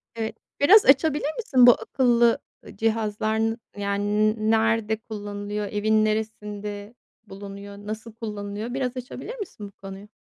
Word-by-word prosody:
Eee, 225 -1 -3 0.3
biraz 400 +9 +7
açabilir 295 +1 +4
misin 260 - +5
bu - - +11
akıllı, 240 -2 +2 0.3
ııı, - - -12
cihazlar, 220 0 0
n 225 0 0 0.2
yani, 205 +1 +1
n 215 +1 +1
nerede 225 -1 +2
kullanılıyor, 205 -1 -5
evin 215 +1 +2
neresinde 210 0 -4 0.3
bulunuyor, 200 +1 -9
nasıl 215 +2 -7
kullanılıyor? 210 0 -5
Biraz 255 -1 -2
açabilir 260 - -7
misin 245 - -7
bu - - -14
konuyu? 195 +1 -10
215 Hz, 135 wpm, -25 LUFS, 205-235 Hz, 0.3 s, bu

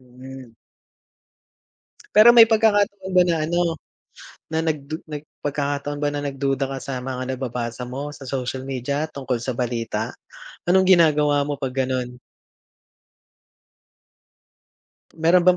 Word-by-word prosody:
Mm. 130 -1 -12 1.6
Pero 220 +3 +9
may 230 -2 +8
pagkakataon 205 -3 +2
ba 180 -1 +6
na 170 -2 +1
ano, 170 0 0 0.8
na 160 - 0
nagdu 155 -1 -2
nag 150 -1 -6 0.2
pagkakataon 145 0 -2
ba 145 - +2
na 145 - -3
nagduda 135 -1 -1
ka 135 0 -5
sa 130 -2 -4
mga 130 0 -4
nababasa 125 -1 -4
mo 140 +4 -5
sa 135 -2 -11
social 130 0 -4
media 140 +4 -2
tungkol 130 -4 -3
sa 125 0 -4
balita, 115 -2 -2 0.5
anong 190 +1 +3
ginagawa 150 -3 +3
mo 145 -1 -4
'pag 135 0 -4
ganon? 125 -1 -3 3.0
Meron 165 +3 +4
bang 180 +1 +4
140 Hz, 125 wpm, -22 LUFS, 130-160 Hz, 3.0 s, Pero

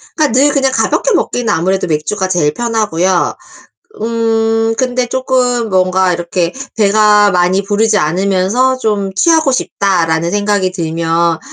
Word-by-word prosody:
그러니까 305 -6 +1
늘 290 +1 +4
그냥 270 -2 +1
가볍게 - - 0
먹기는 245 - -1
아무래도 190 +3 -1
맥주가 165 +5 -2
제일 175 -5 0
편하고요. 205 -7 -1 0.7
음 225 0 0
근데 250 0 -1
쪼금 250 -2 -1
뭔가 185 -1 +1
이렇게 170 0 -2 0.2
'배가 210 0 +4
많이 180 +1 +1
부르지 215 +2 +1
않으면서 195 +9 0
좀 205 -5 -2
취하고 315 - +3
싶다.'라는 170 -8 0
생각이 205 -2 0
들면 165 -1 -1
205 Hz, 310 characters per minute, -13 LUFS, 180-230 Hz, 0.7 s, 늘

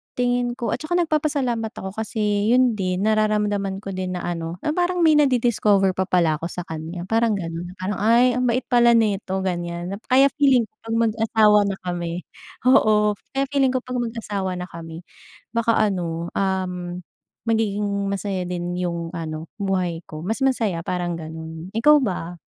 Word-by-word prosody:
tingin 245 -1 0
ko 240 - -3
at - - -1
saka 330 +3 -2
nagpapasalamat 285 -9 0
ako 190 0 -6
kasi 210 -1 -1
yun 255 -1 +4
din 185 -2 -1
nararamdaman 210 -2 +1
ko 195 - -5
din 185 -1 -3
na 180 - -4
ano 165 -1 -3
na 300 - +1
parang 355 +1 +1
may 320 - +6
nadidiscover 225 -8 +3
pa 185 0 -2
pala 170 -5 +2
ako 165 - -3
sa 180 0 -6
kanya 160 +2 -6
parang 225 +2 +1
ganon, 175 0 -5
parang 185 +1 -3
"Ay 235 +4 +5
ang 250 +1 0
bait 240 +1 +1
pala 240 -1 +4
nito 195 -3 0
gan'yan," 175 0 -3 0.2
kaya 270 +2 +5
feeling 265 -4 +5
ko - - -50
'pag 225 - -1
mag-asawa 220 -1 +4
na 195 - -1
kami 175 -1 -3 0.4
oo 215 -5 +4 0.2
kaya 275 - +2
feeling 270 -2 +2
ko 255 - 0
'pag 250 -1 -3
mag-asawa 210 -5 -3
na 180 - -4
kami, 165 0 -9 0.5
baka 230 -1 +2
ano, 170 -4 -2
um, 180 -2 -2 0.4
magiging 205 -3 0
masaya 195 -2 -2
din 175 0 -3
yung 170 -2 -3
ano 160 -2 -6
buhay 185 -4 -1
ko, 155 +1 -8
mas 220 +7 -2
masaya 235 -10 +1
parang 175 -1 -2
ganon, 160 +1 -8
ikaw 295 +6 +6
ba? 180 -8 -3
200 Hz, 170 wpm, -22 LUFS, 175-235 Hz, 0.5 s, may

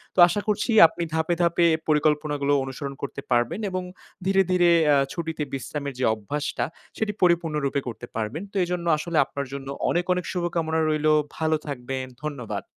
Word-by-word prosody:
তো - - -1
আশা 205 +4 -1
করছি 210 +3 0 0.2
আপনি 170 - -5
ধাপে, 160 +2 +1
ধাপে 170 0 +3 0.2
পরিকল্পনাগুলো 150 -1 +2
অনুসরণ 135 +1 -5
করতে 140 0 -5
পারবেন 120 - +2
এবং 185 -1 -3 0.4
ধীরে, 195 0 +4
ধীরে 175 -1 +4 0.2
আ - - +5 0.2
ছুটিতে 160 -3 -3
বিশ্রামের 140 +1 -4
যে - - +2
অভ্যাসটা, 140 +8 -3 0.3
সেটি 220 -1 0
পরিপূর্ণ 170 -3 +3
রূপে 140 0 0
করতে 120 0 -6
পারবেন। 115 - -3
তো - - -25
এজন্য 175 -1 -3
আসলে 165 +1 -3
আপনার 140 0 -5
জন্য 135 -1 -6 0.2
অনেক, 175 +1 +1
অনেক 180 -1 -3
শুভকামনা 170 -3 -1
রইলো। 155 0 +2 0.2
ভালো 160 0 +1
থাকবেন। 130 -1 -4 0.2
ধন্যবাদ। 140 -7 -4
155 Hz, 165 wpm, -25 LUFS, 140-175 Hz, 0.4 s, আ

